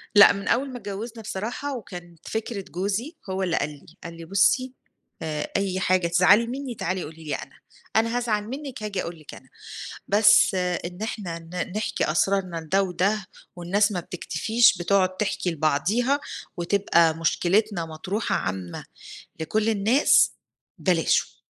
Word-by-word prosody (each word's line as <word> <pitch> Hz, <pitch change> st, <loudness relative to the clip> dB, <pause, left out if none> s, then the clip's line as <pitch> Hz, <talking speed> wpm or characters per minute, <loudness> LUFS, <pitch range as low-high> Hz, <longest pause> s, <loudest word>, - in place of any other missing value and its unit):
لأ، 205 Hz, -, +9 dB
من 200 Hz, 0 st, -6 dB
أول 270 Hz, +4 st, +1 dB
ما 250 Hz, -, -6 dB
اتجوزنا 220 Hz, +2 st, -6 dB
بصراحة 230 Hz, +7 st, -4 dB
وكان 175 Hz, -6 st, -10 dB
فكرة 220 Hz, -1 st, -4 dB
جوزي، 205 Hz, -, -2 dB
هو 190 Hz, 0 st, -1 dB
اللي 175 Hz, -3 st, 0 dB
قال 145 Hz, -, 0 dB
لي، 145 Hz, -2 st, -13 dB, 0.2 s
قال 170 Hz, -, -7 dB
لي: 165 Hz, -, -9 dB
"بُصي، 225 Hz, +8 st, +2 dB, 0.5 s
آآ 155 Hz, -2 st, -3 dB
أي 195 Hz, -1 st, -1 dB
حاجة 185 Hz, -2 st, +2 dB
تزعلي 185 Hz, +6 st, +5 dB
مني 260 Hz, 0 st, -5 dB
تعالي 190 Hz, -3 st, -2 dB
قولي 160 Hz, +2 st, -10 dB
لي 150 Hz, -, -2 dB
أنا. -, -, -10 dB, 0.4 s
أنا 230 Hz, +2 st, +2 dB
هازعل 220 Hz, -4 st, 0 dB
منِك 265 Hz, -2 st, -6 dB
هاجي 200 Hz, -3 st, -2 dB
أقول 170 Hz, -1 st, -6 dB
لِك 155 Hz, -, -11 dB
أنا." 130 Hz, -, -16 dB, 0.6 s
بس 210 Hz, -1 st, +5 dB
إن 180 Hz, 0 st, -2 dB
إحنا 195 Hz, -6 st, -4 dB
ن 180 Hz, +3 st, -5 dB
نحكي 210 Hz, -7 st, -1 dB
أسرارنا 185 Hz, +1 st, +1 dB
لده 165 Hz, +5 st, +1 dB
وده، 190 Hz, +3 st, 0 dB, 0.3 s
والناس 195 Hz, +4 st, +1 dB
ما 185 Hz, -, -2 dB
بتكتفيش 220 Hz, +6 st, +2 dB
بتقعد 185 Hz, +1 st, +1 dB
تحكي 190 Hz, -3 st, -1 dB
لبعضها 185 Hz, -, +1 dB, 0.4 s
وتبقى 170 Hz, -3 st, +3 dB
مشكلتنا 180 Hz, +3 st, +1 dB
مطروحة 175 Hz, +7 st, -2 dB
عامة 95 Hz, -2 st, -4 dB, 0.6 s
لكُلّ 215 Hz, +7 st, 0 dB
الناس 225 Hz, +6 st, +4 dB, 0.5 s
بلاش. 175 Hz, -4 st, +1 dB
195 Hz, 150 wpm, -25 LUFS, 170-220 Hz, 0.6 s, لأ